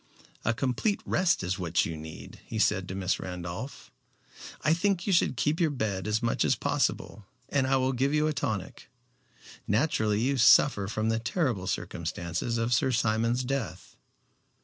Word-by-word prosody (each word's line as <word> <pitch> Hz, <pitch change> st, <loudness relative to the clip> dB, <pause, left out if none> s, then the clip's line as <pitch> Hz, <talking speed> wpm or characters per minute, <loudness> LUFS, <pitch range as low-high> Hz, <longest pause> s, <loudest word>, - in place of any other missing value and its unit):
"A 115 Hz, -, +2 dB
complete 135 Hz, -, 0 dB
rest 175 Hz, -, +2 dB
is 90 Hz, +2 st, -2 dB
what 85 Hz, -1 st, +1 dB
you 80 Hz, -, -4 dB
need," 80 Hz, 0 st, -10 dB
he -, -, -5 dB
said -, -, +2 dB
to 95 Hz, -, -5 dB
Miss 95 Hz, -1 st, -1 dB
Randolph. 90 Hz, +7 st, -7 dB, 0.7 s
"I 155 Hz, -, +3 dB
think 185 Hz, +1 st, 0 dB
you 200 Hz, -, +1 dB
should 170 Hz, -7 st, +2 dB
keep 150 Hz, +5 st, +1 dB
to 170 Hz, -, +3 dB
your -, -, +1 dB
bed 110 Hz, -8 st, -2 dB
as 105 Hz, +2 st, 0 dB
much 115 Hz, -, +1 dB
as -, -, +3 dB
possible, 100 Hz, -1 st, -2 dB, 0.2 s
and 135 Hz, -2 st, +1 dB
I 135 Hz, -, +3 dB
will 130 Hz, 0 st, +1 dB
give 135 Hz, +3 st, +1 dB
you 150 Hz, 0 st, +2 dB
a 155 Hz, -, +1 dB
tonic. 105 Hz, -9 st, -4 dB, 0.8 s
Naturally 110 Hz, -3 st, +1 dB
you 135 Hz, +4 st, +1 dB
suffer 110 Hz, -3 st, +5 dB
from 110 Hz, +1 st, -1 dB
the 115 Hz, 0 st, +1 dB
terrible 115 Hz, -, -1 dB
circumstances 85 Hz, +8 st, -3 dB
of 115 Hz, +1 st, 0 dB
Sir 125 Hz, +3 st, +2 dB
Simon's 115 Hz, +1 st, +1 dB
death." 125 Hz, -, -4 dB
115 Hz, 170 wpm, -28 LUFS, 95-140 Hz, 0.8 s, suffer